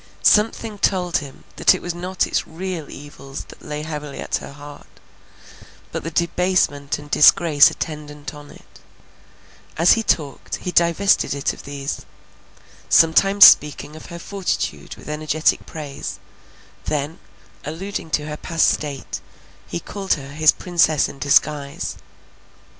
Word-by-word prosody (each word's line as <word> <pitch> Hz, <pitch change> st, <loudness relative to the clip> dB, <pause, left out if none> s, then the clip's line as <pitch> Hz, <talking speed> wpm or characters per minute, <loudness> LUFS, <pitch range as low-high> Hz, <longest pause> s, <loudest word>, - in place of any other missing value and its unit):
Something 215 Hz, 0 st, +2 dB
told 180 Hz, -3 st, +1 dB
him 140 Hz, -2 st, -9 dB
that -, -, +5 dB
it -, -, -5 dB
was 175 Hz, -, -3 dB
not 180 Hz, +2 st, -2 dB
its -, -, -2 dB
real 170 Hz, -2 st, -6 dB
evils 140 Hz, -1 st, -9 dB
that -, -, -14 dB
lay 150 Hz, 0 st, -5 dB
heavily 150 Hz, -2 st, -6 dB
at -, -, -2 dB
her -, -, -10 dB
heart, 145 Hz, 0 st, -12 dB, 1.0 s
but -, -, -4 dB
the 165 Hz, -, -3 dB
debasement 170 Hz, -4 st, 0 dB
and 145 Hz, 0 st, -13 dB
disgrace 150 Hz, -1 st, +6 dB
attendant 150 Hz, -2 st, -7 dB
on 145 Hz, -1 st, -12 dB
it; -, -, -17 dB, 1.0 s
as 170 Hz, +2 st, +5 dB
he 225 Hz, -, +1 dB
talked, 150 Hz, -9 st, -1 dB
he 180 Hz, -, -5 dB
divested 170 Hz, -1 st, +2 dB
it 140 Hz, -, -1 dB
of -, -, -13 dB
these; 140 Hz, 0 st, -5 dB, 0.9 s
sometimes 195 Hz, +5 st, +6 dB
speaking 150 Hz, +1 st, +5 dB
of 155 Hz, -, -11 dB
her 170 Hz, -, -8 dB
fortitude 170 Hz, -, -4 dB
with -, -, -15 dB
energetic 155 Hz, +1 st, 0 dB
praise; 150 Hz, -3 st, -6 dB, 0.7 s
then, 150 Hz, +2 st, -3 dB, 0.4 s
alluding 165 Hz, +3 st, -5 dB
to 150 Hz, -1 st, -1 dB
her 150 Hz, 0 st, -6 dB
past 165 Hz, 0 st, +2 dB
state, 145 Hz, -3 st, -4 dB, 0.5 s
he 85 Hz, -, -4 dB
called 195 Hz, -, -2 dB
her 135 Hz, -2 st, -9 dB
his 155 Hz, 0 st, +5 dB
Princess 170 Hz, -4 st, +1 dB
in 135 Hz, -, -11 dB
disguise. 145 Hz, 0 st, +1 dB
155 Hz, 140 wpm, -21 LUFS, 145-175 Hz, 1.0 s, disgrace